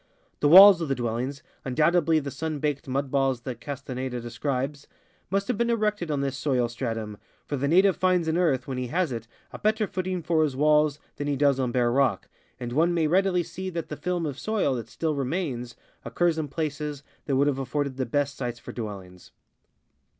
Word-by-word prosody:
The 145 - +3
walls 190 +2 +10
of 165 - -1
the 135 - +1
dwellings, 125 +4 -3 0.2
undoubtedly 160 +4 +2
of 155 - 0
the 140 - -5
sun 155 +2 -3
baked 145 -1 -2
mud 135 +1 -2
balls 135 -3 +1
that 120 -1 -6
Castaheda 130 -3 -5
describes, 135 +4 -3 0.4
must 195 +1 0
have 245 -4 -1
been 235 0 +1
erected 210 -6 0
on 145 -2 0
this 135 -1 -2
soil 130 -3 0
stratum, 115 -3 -4 0.3
for 145 - -3
the 140 +1 -1
native 190 +5 +4
finds 180 -3 +2
in 160 - +1
earth, 155 -8 +1
when 130 -2 -3
he 125 - -3
has 170 +2 0
it, 115 -1 -5 0.3
a - - -7
bet 215 +1 +2
ter 220 -1 0
footing 185 -2 -3
for 160 -1 +2
his 150 -4 0
walls 150 +1 +3 0.2
than 145 - -3
he 145 - 0
does 140 -1 +2
on 125 -2 0
bare 120 -1 +2
rock, 130 -6 +1 0.3
and 120 -1 -5
one 170 +5 +2
may 165 -2 +2
readily 180 +2 +2
see 190 +3 -6
that 170 -3 -5
the 150 - -4
film 175 +1 -2
of 145 -2 -4
soil 215 -10 0
that 115 -3 -5
still 160 +4 -2
remains 135 -4 -3 0.3
occurs 170 -2 0
in 155 - -2
places 150 -1 -4 0.2
that 140 - 0
would 140 +2 +3
have 140 -2 0
afforded 135 0 -2
the 130 - -1
best 140 +2 0
sites 120 -3 -4
for - - -9
dwellings. 95 -5 -8
145 Hz, 210 wpm, -26 LUFS, 130-165 Hz, 0.4 s, walls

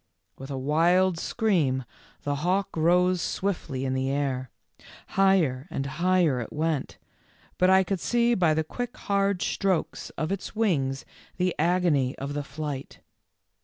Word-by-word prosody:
With 135 +1 -10
a 135 - -3
wild 165 +6 +2
scream 160 - +1 0.4
the 145 0 -1
hawk 185 +6 0
rose 180 +2 +3
swiftly 160 -9 -2
in 130 - -1
the 130 0 -1
air. 135 -2 -1 0.6
Higher 180 -9 +2
and 135 - -3
higher 170 -1 +2
it 115 - -7
went, 155 -2 -2 0.6
but 185 - +4
I 190 0 +6
could 190 0 -2
see 240 +5 +2
by 170 -7 +3
the 160 - +1
quick 245 +9 -5
hard 200 -2 0
strokes 190 -4 -1
of 160 +3 -2
its 195 +1 -4
wings 135 - 0 0.3
the 180 -1 +1
agony 165 -6 +2
of 140 +1 -4
the 145 0 -2
flight. 140 -1 -6
165 Hz, 145 wpm, -26 LUFS, 140-185 Hz, 0.6 s, I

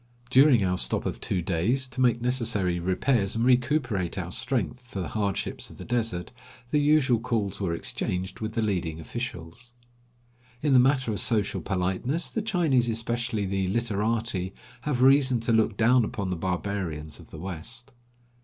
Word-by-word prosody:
During 130 -4 +6
our 90 0 0
stop - - 0
of - - -3
two 90 -3 -1
days, 105 +11 0
to 130 0 -4
make 120 -2 +3
necessary 115 -8 +1
repairs 100 +4 +1
and 115 +1 +1
recuperate 125 - +1
our 90 -2 -4
strength 125 +3 -1
for 115 -6 -6
the 90 - -3
hardships 100 -3 -2
of - - -13
the - - -8
desert, 115 -7 -2 0.4
the 150 - +3
usual 145 -5 +3
calls 105 -4 -2
were 95 -4 0
exchanged 90 +2 -3
with 110 0 -4
the 115 - 0
leading 85 -6 -1
officials. 120 +3 -7 0.9
In 145 -3 +3
the 130 - +7
matter 130 -2 +3
of 105 - -2
social 105 -3 +1
politeness 100 - -1
the 225 - -1
Chinese, 160 - +2
especially 115 -1 -2
the 95 0 -1
"literati," 110 -2 -1 0.3
have 130 -4 0
reason 135 -2 +5
to 115 0 +1
look 110 -2 +2
down 120 +2 +4
upon 100 -3 -3
the - - 0
barbarians 90 -4 -3
of - - -14
the - - -10
West. 95 - -6
110 Hz, 165 wpm, -27 LUFS, 95-125 Hz, 0.9 s, the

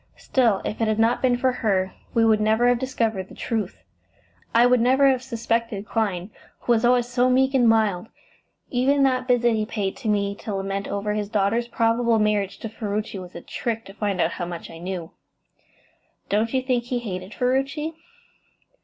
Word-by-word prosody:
Still, 230 -7 +1
if 215 - -4
it 225 - +2
had 215 -1 +1
not 225 +2 +2
been 250 -2 +3
for 260 +1 +2
her, 195 -6 0 0.2
we 230 - +4
should 220 -1 +4
never 220 +3 +3
have 245 -1 +3
discovered 225 -7 -2
the - - -12
truth. 220 -6 -3 0.7
I 235 +1 +5
would 250 0 +4
never 265 +3 +4
have 260 -2 +2
suspected 230 -4 -2
Clyne, 205 -4 -2 0.3
who - - -1
was 225 -2 +3
always 245 0 +3
so 245 +1 +2
meek 265 +1 +3
and 245 -4 +4
mild. 220 -3 +2 0.6
Even 275 +3 +2
that 255 -1 +1
visit 240 -2 +3
he 215 -1 0
paid 205 -2 -3
to 245 - -6
me 200 -1 +1
to 210 -2 -5
lament 195 0 -3
over 200 +1 -2
his 210 -1 -2
daughter's 210 +3 +1
probable 230 0 +2
marriage 210 -2 0
to - - -4
Ferruci 210 -2 -4
was 180 -1 -10
a 170 - -7
trick 225 +3 -4
to 195 - -11
find 200 -2 -2
out - - +2
how 175 - -4
much 175 -1 -7
I 165 - -10
knew." 175 -2 -5 1.2
"Don't 215 +3 +1
you 260 -1 0
think 250 -2 0
he 250 0 -2
hated 190 -4 -6
Ferruci?" 270 +5 0
225 Hz, 190 wpm, -24 LUFS, 200-245 Hz, 1.2 s, I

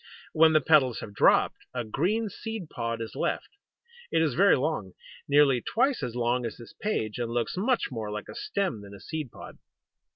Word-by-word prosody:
When 160 0 +6
the 155 - +5
petals 135 -7 +4
have 105 - -8
dropped, - - +4 0.2
a 125 - -1
green 185 - 0
seed 210 -3 -6
pod 115 -2 -3
is 115 - -6
left. - - -2 0.6
It - - +3
is 150 -5 +1
very 195 +6 +5
long 130 - -2 0.3
nearly 140 -3 +4
twice 260 - +1
as 120 - -4
long 120 +1 +1
as 115 - -5
this 120 +6 -12
page 125 - -2
and 120 -1 -2
looks 120 0 -1
much 230 - 0
more 110 -4 -4
like 105 0 -5
a - - -8
stem 200 - -2
than 100 0 -11
a - - -12
seed 155 +1 -5
pod. - - -11
135 Hz, 195 wpm, -28 LUFS, 115-180 Hz, 0.6 s, When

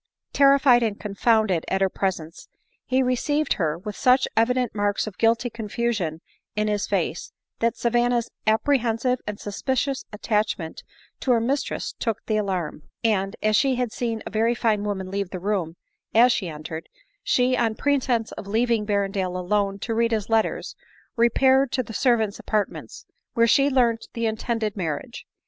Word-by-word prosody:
Terrified 275 -3 +5
and 215 -3 -1
confounded 210 -3 +1
at 190 - 0
her 195 - +4
presence, 175 -4 -4 0.4
he 260 +1 +2
received 290 +4 +1
her 155 -1 0
with 205 +3 -7
such 255 +1 +3
evident 250 +1 +2
marks 205 -1 0
of 210 -4 -9
guilty 230 +2 +3
confusion 215 -7 -2 0.3
in 210 0 0
his 205 -1 -1
face, 175 -4 -2 0.3
that 230 0 +1
Savanna's 240 0 +1 0.2
apprehensive 240 +1 +2
and 210 -1 -4
suspicious 260 +6 -2
attach 210 0 0
ment 160 -2 -7 0.4
to - - -4
her 235 - +3
mistress 265 +5 -2
took 225 -4 -2
the 215 - 0
alarm; 185 -7 -2 0.2
ana, 195 -3 +1
as 215 0 +3
she 265 +2 +3
had 245 -2 -1
seen 230 -2 -3
a - - -6
very 225 +3 +2
fine 215 -3 +1
woman 190 -2 -3
leave 200 -1 -2
the 185 - -5
room 185 -4 -2 0.4
as 245 +3 +7
she 190 -6 -1
entered, 160 +1 -7 0.3
she, 250 0 +2
on 230 -3 0
pretence 255 -4 0
of 200 - -8
leaving 225 0 +1
Berrendale 195 -3 -1
alone 195 +2 0
to 225 +3 -3
read 230 +1 +1
his 215 0 -2
letters, 225 -1 0 0.4
repaired 260 +3 +3
to 255 - +1
the 225 - -9
servants' 220 -3 +1
apartments, 210 -2 -3 0.3
where 230 - +5
she 275 +4 +4
learnt 240 -4 +1
the 230 -1 -2
intended 220 -1 -2
marriage. 185 - -4
220 Hz, 160 wpm, -24 LUFS, 200-240 Hz, 0.4 s, as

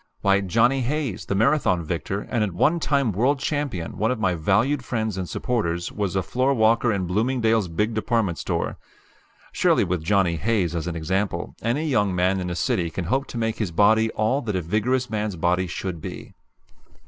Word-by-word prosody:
Why, 100 0 +3
Johnny 120 +8 +2
Hayes, 135 - -2
the 100 - -1
Marathon 110 - +2
victor, 85 +5 -3
and 115 -1 -1
at 100 -4 -2
one 160 - +2
time 140 -6 +1
world 125 +9 +2
champion, 140 - -3
one 110 +2 +2
of 125 -3 -1
my 95 -4 +1
valued 105 - +1
friends 110 -4 -2
and 95 -2 -4
supporters, 85 -8 -2
was 100 -3 -2
a 95 - +1
floor 130 +8 +1
walker 115 +1 +3
in 100 -3 -1
Bloomingdale's 110 +2 +1
big 105 +7 -1
department 110 -5 0
store. - - -2 0.7
Surely - - +3
with 90 -2 -2
Johnny 90 -2 +2
Hayes 95 -3 0
as 85 0 -3
an 85 - -3
example, 90 +2 -2
any 125 +8 0
young 105 -9 +1
man 90 +2 +2
in 90 -1 -3
a 90 - -3
city 85 -1 0
can 85 +1 -4
hope 135 +9 0
to - - -7
make 115 -1 -1
his 105 -5 -1
body 110 +5 +3
all 110 +6 +1
that 105 -6 -3
a 90 - 0
vigorous 120 +8 0
man's 105 -3 -2
body 90 +2 +1
should 85 -1 -5
be. - - -8
105 Hz, 195 wpm, -24 LUFS, 90-120 Hz, 0.7 s, Why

